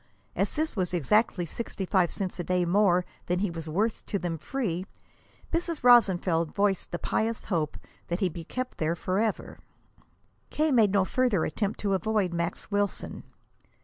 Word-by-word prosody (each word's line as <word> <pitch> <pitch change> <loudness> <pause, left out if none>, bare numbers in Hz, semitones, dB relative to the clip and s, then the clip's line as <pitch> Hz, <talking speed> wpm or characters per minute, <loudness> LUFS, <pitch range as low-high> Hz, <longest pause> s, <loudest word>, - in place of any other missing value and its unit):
As - - 0
this 310 -2 -1
was 180 -3 -1
exactly 180 - +2
sixty 195 +2 -5
five 180 -2 +3
cents 190 -2 -4
a - - -1
day 180 0 +1
more 180 -1 +3 0.2
than 180 - +1
he 195 0 0
was 165 -1 -6
worth 210 +8 0
to 200 - -1
them 175 -3 -2
free, 185 - -3 0.7
Mrs. 335 -3 -2
Rosenfeld 185 -9 +4
voiced 200 -2 +1
the 175 - -2
pious 225 +5 -1
hope 160 -6 -1 0.3
that 175 +2 -2
he 190 - +2
be 170 -1 -6
kept 255 +9 -5
there 160 +1 +1
forever. 195 +5 -1 0.9
K. 310 0 +1
made 225 -6 +5
no 195 -1 +3
further 240 -7 +1
attempt 205 +5 -2
to 200 -1 +1
avoid 195 -1 +1
Max 170 +4 -3
Wilson. 205 -1 -2
190 Hz, 165 wpm, -28 LUFS, 175-220 Hz, 0.9 s, made